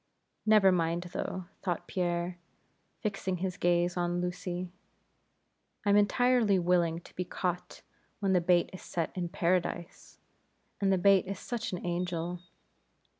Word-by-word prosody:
Never 210 -3 +7
mind 170 -1 +1
though 185 -1 -3 0.2
thought 175 -3 -2
Pierre, 175 -1 -1 0.6
fixing 195 -3 -2
his 185 0 -2
gaze 175 0 +2
on 175 0 0
Lucy 180 0 -3 1.1
I'm 200 0 +5
entirely 220 0 +4
willing 170 -2 +2
to - - -16
be 180 - -1
caught, 180 0 -4 0.4
when 195 -2 +1
the 180 - +4
bait 175 0 +3
is 185 - -8
set 165 -2 -3
in 175 -2 -2
Paradise, 175 -1 -1 0.6
and 195 -1 +2
the 190 - +4
bait 195 0 +5
is 195 0 -3
such 235 +3 -4
an 180 - -5
angel. 175 0 -2
180 Hz, 135 wpm, -30 LUFS, 175-195 Hz, 1.1 s, Never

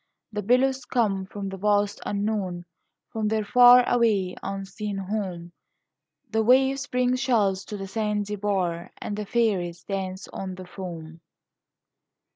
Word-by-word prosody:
The 210 - -2
billows 255 +4 +2
come 200 -6 0
from 200 0 -5
the 195 - -6
vast 205 +1 +1
unknown 200 -4 -2 0.5
From 220 -1 -1
their 215 0 0
far 245 +2 +7
away 215 -7 +2
unseen 195 +1 -5
home; 190 -4 -4 0.8
The 220 - +2
waves 265 +4 +3
bring 250 0 +1
shells 220 -7 +1
to 210 - -6
the 195 - -5
sandy 210 0 -2
bar, 185 -4 -1
And 205 - -4
the 210 -1 -5
fairies 190 -8 0
dance 190 -1 -4
on 190 -1 -6
the 185 0 -9
foam. 165 -3 -8
205 Hz, 135 wpm, -25 LUFS, 190-225 Hz, 0.8 s, far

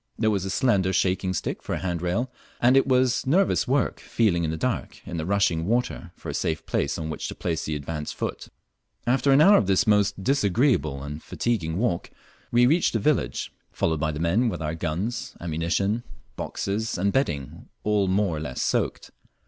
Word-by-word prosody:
There 110 -1 +2
was 100 -2 -1
a - - -3
slender 95 -5 +2
shaking 95 0 +1
stick - - -3
for - - -3
a - - -3
handrail, 90 +7 -1 0.3
and 125 +2 +5
it 135 0 +4
was 130 -1 +2
nervous 185 +8 +3
work 135 0 +1
feeling 95 -7 +1
in 80 - 0
the 80 - -2
dark 125 +6 -2
in 85 - -5
the 80 +1 -3
rushing 90 -4 +1
water 120 +3 -1
for - - -11
a - - -3
safe 80 -1 -2
place - - -1
on 80 -1 -4
which 75 - -4
to - - -6
place 80 -2 -2
the 75 - -2
advanced 75 +1 -5
foot. - - -4 0.6
After 130 +3 +3
au 135 - +6
hour 200 +7 +8
of 100 - +1
this 95 +4 +3
most 100 -2 +2
disagreeable 115 - +2
and 75 +2 -6
fatiguing 90 -9 -2
walk 105 -5 -1 0.4
we 120 +1 +5
reached 160 +7 +3
the 115 - +1
village, 150 +7 0 0.2
followed 80 -2 0
by 80 0 0
the 75 - -5
men 95 +9 +2
with - - -4
our 75 0 -2
guns, 85 +8 -3
ammunition, 85 +7 -1 0.3
boxes, 105 +2 -3
and 100 +3 +1
bedding 75 - -2
all 105 -2 +2
more 95 -2 +1
or - - -3
less 65 -5 -5
soaked. - - -1
100 Hz, 195 wpm, -25 LUFS, 80-120 Hz, 0.6 s, hour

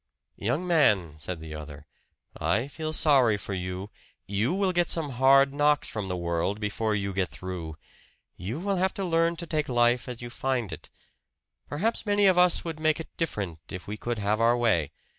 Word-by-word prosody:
"Young 125 - -1
man," 105 - +3
said 85 +2 -5
the 80 -1 -8
other, 75 -1 -9 0.5
"I 115 +5 0
feel 155 +2 -5
sorry 135 -9 +5
for 100 - -6
you 90 +2 -5 0.3
you 105 - 0
will 190 0 +1
get 175 -1 +1
some 155 -4 0
hard 135 +2 +5
knocks 145 0 +2
from 105 -3 -4
the 90 -1 -3
world 85 +4 -1
before 105 +1 -1
you 100 -1 -2
get 95 -2 0
through. 90 -4 -6 0.6
You 110 - -5
will 195 +1 -1
have 190 +3 0
to 195 -3 -2
learn 165 0 +2
to 170 +1 -4
take 155 -3 -1
life 120 0 +2
as 120 -2 -6
you 120 -1 -7
find 125 -5 -1
it. - - -9 0.8
Perhaps 210 +11 -1
many 205 0 +3
of 185 -2 +5
us 180 -1 +4
would 165 -2 -5
make 155 0 +2
it 160 - -9
different, 100 - -3
if 95 -2 -7
we 105 - -5
could 120 +2 -3
have 105 +2 0
our 120 +1 +4
way. 105 -12 +1
120 Hz, 195 wpm, -27 LUFS, 95-155 Hz, 0.8 s, sorry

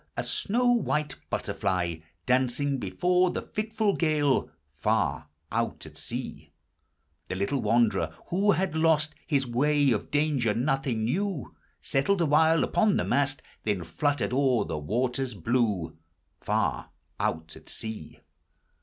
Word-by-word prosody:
a - - 0
snow 240 +5 0
white 150 - 0
butterfly 85 -3 -1 0.3
Dancing 130 +2 +1
before 180 - +2
the - - -3
fitful 215 -1 -1
gale, 150 -4 +2 0.2
Far - - 0 0.2
out 115 -4 -2
at 75 -1 -12
sea! 80 - -6 0.7
The - - -3
little 100 +9 -1
wanderer, 105 -7 +2 0.2
who 200 +3 +3
had 185 -4 -1
lost 160 -1 +2
His 140 -3 +1
way, 140 +3 +2
of 105 - -1
danger 145 -7 +1
nothing 130 -3 0
knew; 180 - -2 0.3
Settled 160 +9 +1
awhile 160 +1 +4
upon 215 -3 +2
the - - +1
mast, 140 -1 0 0.2
Then 100 -5 -1
fluttered 125 - -1
o'er 130 -5 +2
the 75 - -3
waters 125 - -1
blue, 105 -8 0 0.4
Far - - -1 0.3
out 80 +1 -2
at - - -14
sea. 110 -1 -6
135 Hz, 130 wpm, -27 LUFS, 110-155 Hz, 0.7 s, awhile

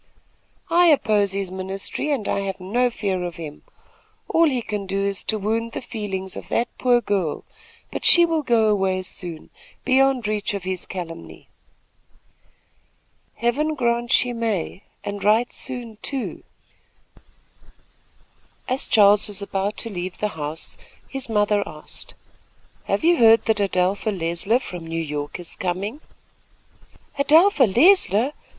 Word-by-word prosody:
"I 350 +1 +5
oppose 210 - +3
his 195 -2 -3
ministry, 190 +9 -3
and 270 -8 -1
I - - 0
have 195 -1 -4
no 240 +7 +1
fear 195 -5 -2
of 175 -2 -5
him. 155 -3 -8 0.7
All 330 - +4
he 250 -4 -2
can 205 -3 -4
do 195 +1 -1
is 200 -1 0
to 220 - 0
wound 225 +3 -2
the - - -3
feelings 195 -5 -4
of - - -8
that 235 - +1
poor 245 -1 +3
girl; 190 -9 -1 0.5
but - - -5
she 345 0 +7
will 325 -2 0
go 235 -5 +2
away 190 -3 +1
soon, 175 -3 -5 0.3
beyond 260 -3 +3
reach 210 -1 -1
of 195 - -5
his 185 -1 -4
calumny." 170 -3 -8 1.9
"Heaven 295 +7 0
grant 240 -2 0
she 245 -1 +3
may, 220 -6 -2 0.2
and 205 0 -5
right 220 +4 +3
soon, 240 -4 -5
too." 270 -3 -4 2.3
As 260 +1 0
Charles 205 -2 +5
was 205 -1 -1
about 200 +1 -2
to 230 - -4
leave 180 0 -5
the 210 - -1
house, 155 -2 -6 0.3
his 270 -3 -6
mother 210 -1 +2
asked: 150 0 -10 0.7
"Have - - -1
you 340 +1 +4
heard 225 -2 +6
that 220 -2 +1
Adelpha 195 +2 0
Leisler 180 +3 0
from 180 -9 -8
New 165 0 -3
York 150 0 -4
is 175 - -3
coming?" 195 - -3 1.2
"Adelpha 310 +1 +5
Leisler! 255 - +4
210 Hz, 140 wpm, -22 LUFS, 185-245 Hz, 2.3 s, she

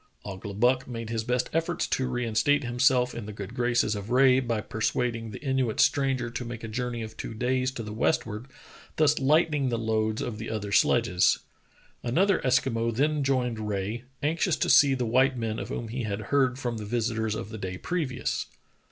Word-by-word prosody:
Ouglibuck 105 +6 0
made 115 -2 -6
his 115 -1 -1
best 125 +1 0
efforts 165 +1 0
to 130 - -1
reinstate 125 +3 +1
himself 125 +1 +2
in 115 -3 -6
the - - -5
good 100 +1 -7
graces 120 -3 +1
of 100 0 -6
Rae 130 +1 +5
by 120 -4 -1
persuading 115 +1 -2
the - - -8
Inuit 130 -5 0
stranger 135 -4 +2
to 125 - -4
make 120 -1 -7
a - - -4
journey 120 +1 -3
of 110 0 -8
two 115 - -6
days 130 +2 0
to 115 - -5
the 105 0 -6
westward, 110 -1 -1 0.5
thus 155 -1 +3
lightening 150 0 +2
the 120 - -1
loads 110 -1 0
of 115 -3 -5
the 115 - -5
other 105 -2 -4
sledges. 100 -4 +3 0.6
Another 185 +10 +2
Eskimo 125 -3 +1
then 145 +5 +1
joined 125 -4 0
Rae, 105 +4 -3 0.2
anxious 160 +3 +1
to - - +1
see 140 -2 +6
the 125 -2 -1
white 130 +3 +3
men 110 -2 -2
of - - -6
whom 115 -1 -4
he 125 +3 -3
had 105 -2 -3
heard 130 -3 +3
from 120 -4 -3
the 105 - -6
visitors 110 -1 -1
of 110 -1 -5
the 110 -1 -7
day 95 -1 -4
previous. 145 - -2
120 Hz, 190 wpm, -27 LUFS, 110-130 Hz, 0.6 s, see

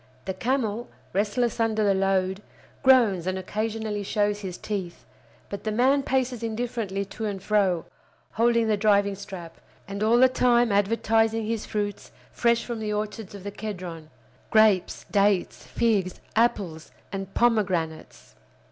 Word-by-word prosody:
The 190 - -2
camel, 235 +1 -1 0.2
restless 215 +4 0
under 220 -1 +1
the 200 -1 +4
load, 190 0 +1 0.4
groans 230 -10 +4
and 185 0 -1
occasionally 215 +2 -3
shows 205 +1 0
his 185 -3 -6
teeth; 190 -5 -5 0.4
but 200 - -7
the 215 - -1
man 260 +6 +3
paces 260 -3 -1
indifferently 225 -3 -3
to 220 +3 -6
and 200 -2 -3
fro, 190 -4 +1 0.5
holding 230 0 +2
the 215 -1 +2
driving 200 -1 +3
strap, 190 -4 -9 0.3
and 200 +1 -5
all 225 +2 +4
the 260 +1 +7
time 245 -2 +3
advertising 225 +2 +2
his 225 0 -3
fruits 205 -2 -3 0.2
fresh 235 -1 +1
from 235 -2 -4
the 215 -1 -3
orchards 210 -1 -4
of 195 - -10
the 200 - -5
Kedron—grapes, 180 - -1
dates, 200 -2 +1
figs, 200 -6 0 0.2
apples, 195 -8 0 0.2
and 195 0 -6
pomegranates. 185 -9 0
210 Hz, 140 wpm, -26 LUFS, 195-225 Hz, 0.5 s, the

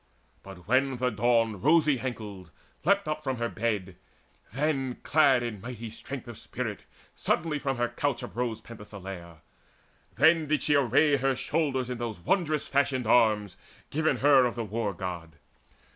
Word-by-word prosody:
But 95 -2 -12
when 130 +2 +2
the 125 +1 0
Dawn, 115 +1 +2
the 105 - -7
rosy 150 - +4
ankled, 105 -8 -6 0.3
leapt 200 -2 +2
Up 155 0 -3
from 130 -3 -2
her 115 0 -1
bed, 100 -6 -2 0.5
then, 135 -3 -1
clad 140 -5 +4
in 110 -5 -5
mighty 115 -1 -7
strength 130 +2 -8
Of 120 -2 -9
spirit, 115 -5 -5 0.3
suddenly 155 -3 -1
from 135 -3 -2
her 120 0 +1
couch 140 +1 -2
uprose 120 -2 -3
Penthesileia. 95 -7 -10 0.7
Then 160 0 +4
did 155 +1 +1
she 150 - +2
array 140 +2 +4
Her 135 0 +1
shoulders 135 -3 -1
in 125 -1 -5
those 115 -5 -4
wondrous 155 - 0
fashioned 135 -3 +1
arms 105 -4 +3 0.3
Given 155 -2 +1
her 135 -1 +5
of 120 - -5
the 115 -1 -3
War 105 0 -2
god. 85 -3 -6
125 Hz, 160 wpm, -28 LUFS, 110-140 Hz, 0.7 s, her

